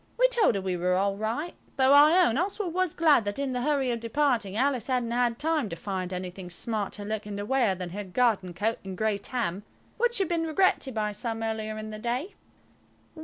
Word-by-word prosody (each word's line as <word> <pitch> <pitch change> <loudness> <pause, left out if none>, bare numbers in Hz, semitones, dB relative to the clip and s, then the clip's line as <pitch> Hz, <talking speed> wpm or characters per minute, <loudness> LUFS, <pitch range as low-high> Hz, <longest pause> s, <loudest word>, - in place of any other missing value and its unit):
We - - +5
told 470 - +3
her 195 - -1
we 185 -1 -2
were 180 +1 +1
all 195 +1 +1
right, 230 - -3 0.2
though 265 0 +4
I 310 +6 +7
own 230 - +1
Oswald 370 +2 -1
was 370 -2 0
glad 310 -8 +4
that 205 0 -3
in 275 -2 -2
the 250 - -1
hurry 275 -2 +1
of 235 - -2
departing 230 -4 0
Alice 255 -2 +1
hadn't 250 -3 0
had 240 -1 +1
time 305 -6 0
to 165 - -5
find 185 +1 -4
anything 180 0 -6
smarter 205 +2 -2
looking 210 -1 -4
to 205 - -4
wear 240 -5 +2
than 180 -1 -6
her 205 +3 -5
garden 190 -3 0
coat 220 +5 -1
and 190 -1 -7
grey 215 -1 0
Tam, 205 -5 -3 0.4
which 480 +1 +1
had 385 - +2
been 330 -1 -1
regretted 315 -6 +1
by 210 -1 0
some 225 +2 -4
earlier 220 -1 -3
in 215 0 -6
the 215 - -7
day. 245 - -3
230 Hz, 215 wpm, -27 LUFS, 200-285 Hz, 0.4 s, I